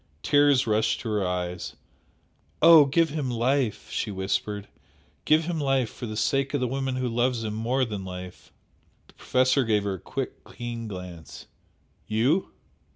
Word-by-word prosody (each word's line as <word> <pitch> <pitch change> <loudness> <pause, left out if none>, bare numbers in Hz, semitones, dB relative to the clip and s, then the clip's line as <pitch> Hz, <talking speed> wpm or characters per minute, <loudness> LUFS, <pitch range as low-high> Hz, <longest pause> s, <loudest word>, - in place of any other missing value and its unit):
Tears 145 -2 +4
rushed 110 -1 +1
to 115 - -4
her 105 -2 0
eyes 90 0 -4 0.8
"Oh, 165 -2 +8
give 160 +4 +2
him 145 -3 -3
life!" 125 0 0
she - - -2
whispered 100 +1 -2 0.6
"Give 155 +1 +4
him 170 -1 -2
life 135 -4 +1
for 120 - -7
the 110 0 -5
sake 135 +6 0
of - - +1
the 125 - 0
woman 135 +1 -2
who 130 -1 -1
loves 120 0 0
him 105 -1 -3
more 120 +4 0
than 105 -4 -5
life!" 90 -1 -9 0.5
The - - -22
Professor 130 +1 +2
gave 105 -3 +1
her 100 -1 -1
a 95 - -6
quick, - - -5
keen 120 -1 -5
glance. 90 -5 -9 0.6
"You?" 125 - +1
120 Hz, 160 wpm, -26 LUFS, 105-135 Hz, 0.8 s, Oh